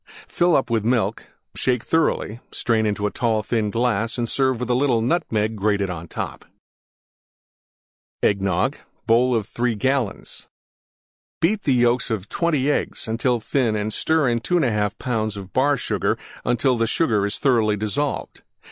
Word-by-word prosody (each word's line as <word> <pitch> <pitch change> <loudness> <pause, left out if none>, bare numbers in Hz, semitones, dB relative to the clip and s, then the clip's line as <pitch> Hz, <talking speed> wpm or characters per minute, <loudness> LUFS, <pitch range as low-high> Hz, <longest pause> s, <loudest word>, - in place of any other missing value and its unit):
Fill 175 0 +2
up 130 - +1
with 115 -3 +1
Milk; 115 0 0 0.3
shake 125 -3 0
thoroughly; 140 -8 0
strain 110 -2 +1
into 105 0 -1
tall, 110 -3 0
thin 110 -1 0
glass 115 0 0
and 120 -1 -1
serve 130 -1 +1
with 125 0 -2
little 125 -1 +2
Nutmeg 110 -5 0
grated 100 -2 0
on 85 -1 -7
top. - - -5 1.8
EGGNOG 100 +6 +1 0.3
(bowl 120 +2 +3
of 110 -3 0
3 120 -1 -1
gallons) 130 -1 -2 0.9
Beat 205 +6 +1
the 135 - +3
yolks 120 +1 +2
of 105 -4 -3
20 150 -5 +1
Eggs - - -2
until 120 +2 0
thin 115 -1 0
and 105 0 -2
stir 160 -3 +1
in 120 -1 +1
2 175 +9 -1
1/2 105 - +1
lbs. 110 -5 -3
Bar 140 +2 +3
Sugar 115 - -1 0.3
until 120 0 +1
Sugar 110 -6 +1
is 100 +3 -1
thoroughly 115 -6 +2
dissolved. 135 +8 -3
115 Hz, 145 wpm, -22 LUFS, 105-130 Hz, 1.8 s, bowl